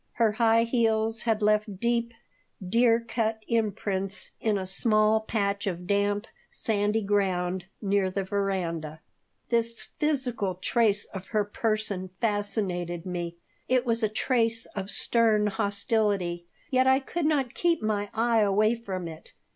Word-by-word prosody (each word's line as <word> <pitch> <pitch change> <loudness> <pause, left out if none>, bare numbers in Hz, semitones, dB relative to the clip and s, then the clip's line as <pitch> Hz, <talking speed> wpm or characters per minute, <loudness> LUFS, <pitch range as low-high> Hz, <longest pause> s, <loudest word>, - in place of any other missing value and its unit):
Her 230 -2 +2
high 230 +1 +3
heels 225 -2 +1
had 225 -2 0
left 210 -2 +1
deep, 235 0 0 0.5
dear 230 +3 +4
cut 225 -1 -2
imprints 195 -4 -1
in 215 -2 +1
a 190 - -3
small 215 +2 +3
patch 200 -2 -1
of 180 -2 -3
damp, 205 +2 +1 0.2
sandy 210 0 0
ground 190 -3 0 0.2
near 200 -1 +2
the 195 +1 -2
veranda. 180 -6 -2 0.5
This 230 -1 -1
physical 250 -10 0
trace 205 +2 +1
of 190 -1 -9
her 215 -2 +1
person 210 -3 -2
fascinated 195 -6 -2
me. 175 -2 -4 0.3
It 255 0 +2
was 230 -1 +1
a 215 - +2
trace 230 0 0
of 195 -1 -4
stern 220 -1 +2
hostility, 200 -4 0 0.2
yet 260 0 +3
I 265 0 +6
could 305 +3 -2
not 275 -6 +1
keep 335 -8 +1
my 205 -1 -1
eye 230 0 +2
away 210 +2 +3
from 190 -7 -5
it. 160 -1 -11
215 Hz, 140 wpm, -27 LUFS, 195-230 Hz, 0.5 s, I